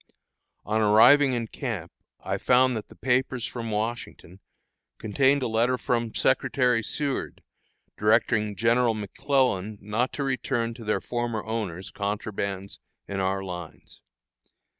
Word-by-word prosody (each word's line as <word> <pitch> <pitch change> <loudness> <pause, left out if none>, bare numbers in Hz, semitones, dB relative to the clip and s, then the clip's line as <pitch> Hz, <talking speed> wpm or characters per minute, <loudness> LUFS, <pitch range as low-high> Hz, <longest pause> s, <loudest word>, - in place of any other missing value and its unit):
On 110 +1 0
arriving 125 +7 +6
in 120 -2 -1
camp - - -5 0.3
I - - -3
found 125 0 +4
that 110 - -5
the - - -16
papers 125 -2 0
from 115 -2 -5
Washington 110 -4 -4 0.6
contained 135 +6 +2
a - - 0
letter 115 +3 +2
of 120 -2 -2
Secretary 125 -3 +2
Seward, 140 +5 -3 0.6
directing 105 -1 +2
General 115 +1 +2
McClellan 110 -1 0
not 110 +5 -1
to 140 - -3
return 125 -3 -1
to 115 - -11
their 105 -3 0
former 120 -2 -3
owners 105 -5 -4
contrabands 100 -1 -4 0.3
in 100 -1 -3
our 95 0 0
lines. 90 -3 -9
115 Hz, 125 wpm, -26 LUFS, 105-125 Hz, 0.6 s, arriving